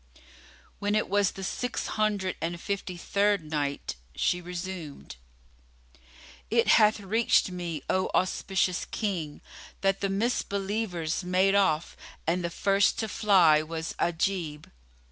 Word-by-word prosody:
When 205 +1 0
it 215 - +1
was 200 -1 +3
the 195 - -7
Six 245 +5 -3
Hundred 205 -4 0
and 170 +1 -3
Fifty 195 -1 -4
third 200 +1 +1
Night, 145 - -3 0.2
She 175 - +1
resumed, 175 - -7 1.3
It - - +2
hath 215 0 +5
reached 205 0 +2
me, 170 -5 -4
O 185 0 +1
auspicious 185 -1 0
King, 175 -9 -3 0.4
that 195 0 +1
the 195 - 0
Misbelievers 195 -5 -1
made 185 +2 +3
off 180 -5 +2 0.3
and 175 +2 0
the 170 - -1
first 195 +3 +2
to 220 - -1
fly 185 -8 +5
was 160 +1 -5
Ajib. 165 -3 -1
185 Hz, 125 wpm, -28 LUFS, 165-200 Hz, 1.3 s, hath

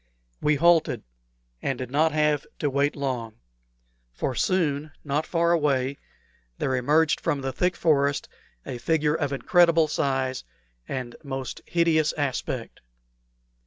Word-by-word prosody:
We 150 0 +3
halted, 170 +2 +3 0.6
and 135 - -1
did 125 -1 -6
not 155 +3 +3
have 150 -2 +1
to 145 - -1
wait 140 +2 +1
long; 125 -5 -3 0.8
for - - -3
soon, 155 -2 0
not 150 +2 -1
far 170 0 +2
away, 140 -4 +1 0.6
there 130 - 0
emerged 150 +5 +2
from 150 -4 -1
the 135 0 -3
thick 180 +4 +1
forest 140 -3 +2 0.4
a 120 - -5
figure 150 +2 +1
of 145 -3 -1
incredible 165 +2 +4
size 135 -3 -1 0.4
and 125 -3 -5
most 135 -2 -5
hideous 165 -3 +2
aspect. 145 -4 -3
145 Hz, 125 wpm, -25 LUFS, 135-160 Hz, 0.8 s, incredible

